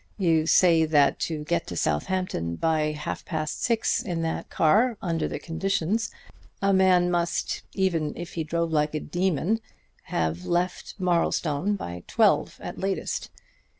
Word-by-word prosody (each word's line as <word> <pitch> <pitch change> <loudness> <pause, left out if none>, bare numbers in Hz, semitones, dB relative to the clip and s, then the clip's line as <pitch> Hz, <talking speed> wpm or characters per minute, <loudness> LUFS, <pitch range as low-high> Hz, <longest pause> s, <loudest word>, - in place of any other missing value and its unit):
You 165 -5 +2
say 165 0 +5
that 145 -3 +3
to 155 -2 -4
get 170 +2 -1
to 85 - -5
Southampton 85 - -1
by 155 - +1
half 150 - -5
past 155 -3 -3
six 230 0 +1
in 175 -8 -3
that 160 - -3
car 215 +9 +3
under 165 -3 -1
the - - -4
conditions, 195 +5 -1 0.5
a 195 0 +2
man 185 -2 +4
must, 170 -1 -1
even 165 -6 0
if 175 0 -7
he 165 - -2
drove 170 +1 -1
like 150 -1 +1
a - - 0
demon, 180 +6 0 0.5
have 80 +1 -1
left 175 +1 -1
Marlstone 175 0 +1
by 90 - -6
twelve - - +2
at - - -6
latest. 195 0 -2
170 Hz, 150 wpm, -26 LUFS, 155-185 Hz, 0.5 s, say